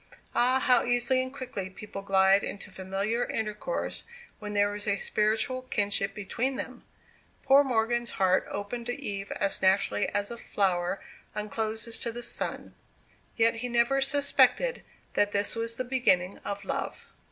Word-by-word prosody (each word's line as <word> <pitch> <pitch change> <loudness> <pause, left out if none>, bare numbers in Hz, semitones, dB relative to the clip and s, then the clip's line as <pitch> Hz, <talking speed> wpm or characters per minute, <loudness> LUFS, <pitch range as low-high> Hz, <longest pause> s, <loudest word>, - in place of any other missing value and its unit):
Ah, 255 +2 +3
how 250 -2 +4
easily 245 +2 +2
and 260 0 -4
quickly 255 -8 -5
people 195 +1 -8
glide 195 0 +4
into 205 0 -6
familiar 195 +5 -1
intercourse 220 - -2 0.4
when 210 -1 -6
there 205 0 +2
is 205 +1 -5
a 200 -1 +2
spiritual 220 +6 0
kinship 205 -5 0
between 240 +6 -2
them! 250 -1 -6 0.6
Poor 275 +1 +6
Morgan's 240 -2 0
heart 185 -1 +2
opened 235 +4 -4
to 245 +3 -3
Eve 200 -7 -4
as 200 -1 0
naturally 190 +2 +2
as 205 +2 -2
a 235 - -5
flower 185 -1 0 0.4
uncloses 220 +2 -2
to 235 - -1
the 240 +1 -7
sun. 235 - -4 0.6
Yet 230 0 +4
he 245 +2 -3
never 240 +3 +3
suspected 285 - +3 0.3
that 205 0 +2
this 200 +2 +1
was 230 0 -3
the 255 - -1
beginning 200 -8 +1
of 200 0 -5
love. - - -3
220 Hz, 150 wpm, -28 LUFS, 200-245 Hz, 0.6 s, Poor